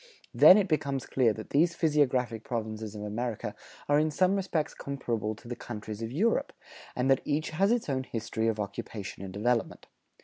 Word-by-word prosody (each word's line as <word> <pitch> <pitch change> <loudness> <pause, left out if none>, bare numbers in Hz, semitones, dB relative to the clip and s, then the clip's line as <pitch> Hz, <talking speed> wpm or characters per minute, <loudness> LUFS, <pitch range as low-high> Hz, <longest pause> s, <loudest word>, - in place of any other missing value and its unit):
Then 185 - +9
it 205 -2 +2
becomes 140 -5 -1
clear 125 -4 +2
that 110 +1 -9
these 170 +4 +3
physiographic 130 -9 +1
provinces 110 -3 -4
of 105 - -6
America 110 +2 -3 0.3
are 145 0 +4
in 155 +1 +2
some 185 +5 +2
respects 185 -6 -1
comparable 115 -6 -3
to 115 - -15
the 120 - -4
countries 110 -2 -7
of 115 0 -4
Europe, 210 - +1 0.4
and 125 +1 0
that 135 - +4
each 150 +2 -1
has 195 +7 +2
its 240 -1 +1
own 135 -2 0
history 115 -1 -2
of 110 -1 0
occupation 105 -1 -5
and 95 - -6
development. 115 +4 -1
125 Hz, 180 wpm, -29 LUFS, 110-150 Hz, 0.4 s, Then